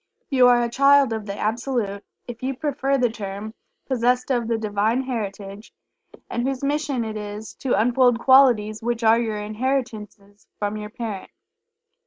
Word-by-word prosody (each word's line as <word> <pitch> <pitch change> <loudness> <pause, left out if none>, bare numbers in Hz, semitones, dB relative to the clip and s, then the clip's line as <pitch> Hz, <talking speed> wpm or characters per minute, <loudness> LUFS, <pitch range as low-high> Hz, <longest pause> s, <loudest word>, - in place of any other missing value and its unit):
You 255 -2 +5
are 240 -1 +4
a - - 0
Child 275 0 +4
of 220 -1 -5
the 200 0 -5
Absolute, 220 -2 -2 0.2
if 240 -1 -8
you 260 0 -3
prefer 275 -1 0
the 245 -3 +1
term, 205 0 -6 0.3
possessed 250 0 0
of 240 -3 0
the 230 -1 0
Divine 215 +3 0
Heritage, 205 -4 -6 0.6
and 235 - -3
whose 265 +1 -2
mission 280 -4 -1
it 220 -1 -5
is 210 +1 -7
to 250 -6 0
unfold 245 +1 +3
qualities 240 -5 +4
which 235 0 -2
are 225 +1 +5
your 220 -3 -2
inheritances 215 -2 -4
from 205 0 -2
your 210 0 -6
Parent. 215 -4 -6
230 Hz, 160 wpm, -23 LUFS, 210-255 Hz, 0.6 s, You